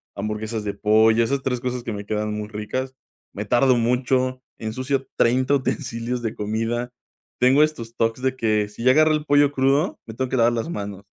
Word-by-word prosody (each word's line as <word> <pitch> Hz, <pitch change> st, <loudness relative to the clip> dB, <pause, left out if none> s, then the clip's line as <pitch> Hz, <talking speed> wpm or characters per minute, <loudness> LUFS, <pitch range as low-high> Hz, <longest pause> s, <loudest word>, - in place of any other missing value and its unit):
hamburguesas 105 Hz, +2 st, -4 dB
de 100 Hz, -1 st, -3 dB
pollo, 110 Hz, +2 st, +4 dB
esas 135 Hz, +3 st, -1 dB
3 125 Hz, -2 st, -1 dB
cosas 125 Hz, 0 st, -3 dB
que 115 Hz, -, -4 dB
me 100 Hz, 0 st, -5 dB
quedan 105 Hz, 0 st, -2 dB
muy 105 Hz, 0 st, -4 dB
ricas. 110 Hz, +5 st, -4 dB, 0.4 s
Me 105 Hz, -, -5 dB
tardo 125 Hz, +4 st, +3 dB
mucho, 125 Hz, +2 st, 0 dB, 0.2 s
ensucio 130 Hz, +5 st, -2 dB
30 130 Hz, +3 st, +2 dB
utensilios 120 Hz, -3 st, -2 dB
de 115 Hz, -1 st, -2 dB
comida. 115 Hz, +3 st, -2 dB, 0.5 s
Tengo 130 Hz, +4 st, +5 dB
estos 120 Hz, -7 st, -1 dB
TOC 115 Hz, -1 st, 0 dB
de 130 Hz, +1 st, -1 dB
que, 110 Hz, -4 st, +1 dB
si 105 Hz, +3 st, -9 dB
ya 130 Hz, -, +5 dB
agarré 155 Hz, 0 st, +5 dB
el 150 Hz, -1 st, -1 dB
pollo 145 Hz, -1 st, +4 dB
crudo, 135 Hz, +2 st, +1 dB
me 110 Hz, -, -8 dB
tengo 130 Hz, +1 st, -1 dB
que 130 Hz, -, -1 dB
lavar 120 Hz, 0 st, +4 dB
las 115 Hz, +7 st, -2 dB
manos, 100 Hz, -, -6 dB
120 Hz, 195 wpm, -23 LUFS, 110-130 Hz, 0.5 s, Tengo